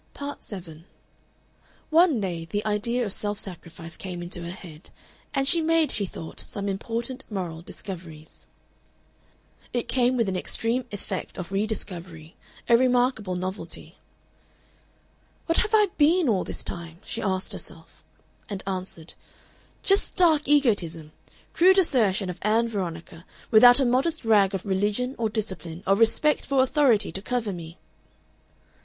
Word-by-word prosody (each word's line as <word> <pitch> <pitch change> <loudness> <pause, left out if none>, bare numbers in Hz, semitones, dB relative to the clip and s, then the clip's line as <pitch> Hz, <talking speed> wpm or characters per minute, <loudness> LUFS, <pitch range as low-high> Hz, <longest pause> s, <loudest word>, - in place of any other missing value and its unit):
Part 285 0 -6
7 165 -6 -9 1.1
One 325 -5 +5
day 175 -5 -3
the 205 +5 -3
idea 230 +3 0
of 200 - -2
self 205 0 -2
sacrifice 165 -3 -4
came 180 -2 -6
into 175 0 -2
her 170 - -5
head, 170 -3 -11 0.4
and 270 0 0
she 335 +3 +4
made, 325 -1 +2
she 200 -2 0
thought, 160 - -9
some 200 0 -4
important 235 +6 -3
moral 175 -6 -4
discoveries. 165 -4 -10 1.3
It 240 -1 -1
came 250 0 +2
with 230 -3 +1
an 190 - -1
extreme 230 +6 -1
effect 205 - -5
of 180 0 -6
re 200 +2 0
discovery, 170 -6 -5 0.3
a 235 - +6
remarkable 245 -6 +1
novelty. 185 +2 -6 1.5
"What 330 - +1
have 445 -1 +2
I 420 -2 +4
been 325 +2 +4
all 200 -6 +2
this - - -4
time?" 170 -1 -5
she 230 - -4
asked 190 -2 0
herself, - - -8 0.5
and 200 -2 -5
answered, 185 -4 -5 0.7
"Just 390 0 +4
stark 325 -6 +3
egotism, 195 - +1 0.4
crude 375 +3 +5
assertion 220 - +2
of 180 - -6
Ann 225 +3 +2
Veronica, 170 -6 -5 0.3
without 245 +3 +8
a 270 - +3
modest 265 +4 +1
rag 200 -3 +4
of 190 - -4
religion 205 +6 0
or 225 -2 +1
discipline 185 -6 -4
or 195 - +4
respect 230 +8 +4
for 270 -2 +3
authority 260 - +3
to 190 - -2
cover 225 -2 -2
me!" 165 -1 -9
210 Hz, 145 wpm, -25 LUFS, 180-250 Hz, 1.5 s, without